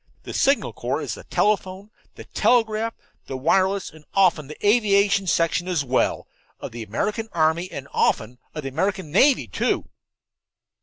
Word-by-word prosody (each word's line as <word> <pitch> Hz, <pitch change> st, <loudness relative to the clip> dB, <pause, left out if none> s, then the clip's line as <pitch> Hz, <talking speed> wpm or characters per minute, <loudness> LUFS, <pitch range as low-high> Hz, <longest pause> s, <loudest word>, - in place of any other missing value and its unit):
The -, -, -7 dB
Signal 275 Hz, +1 st, +2 dB
Corps -, -, -3 dB
is -, -, -4 dB
the -, -, -10 dB
telephone, 200 Hz, -1 st, -1 dB, 0.2 s
the -, -, -10 dB
telegraph, 225 Hz, -2 st, +1 dB, 0.3 s
the 135 Hz, -, -4 dB
wireless, 190 Hz, +7 st, +1 dB
and 155 Hz, -1 st, -16 dB
often 180 Hz, -7 st, +3 dB
the 150 Hz, +7 st, -4 dB
aviation 200 Hz, -3 st, +3 dB
section 170 Hz, +1 st, +1 dB
as 170 Hz, -6 st, 0 dB
well, 130 Hz, 0 st, 0 dB, 0.3 s
of -, -, -7 dB
the 115 Hz, 0 st, -7 dB
American 210 Hz, -, -3 dB
army, 165 Hz, +2 st, +1 dB
and 135 Hz, -1 st, -7 dB
often 120 Hz, +3 st, 0 dB, 0.2 s
of 155 Hz, -, -5 dB
the 135 Hz, -, -3 dB
American 185 Hz, +3 st, -2 dB
navy, 265 Hz, -, +4 dB
too." -, -, -1 dB
185 Hz, 155 wpm, -23 LUFS, 150-205 Hz, 0.3 s, navy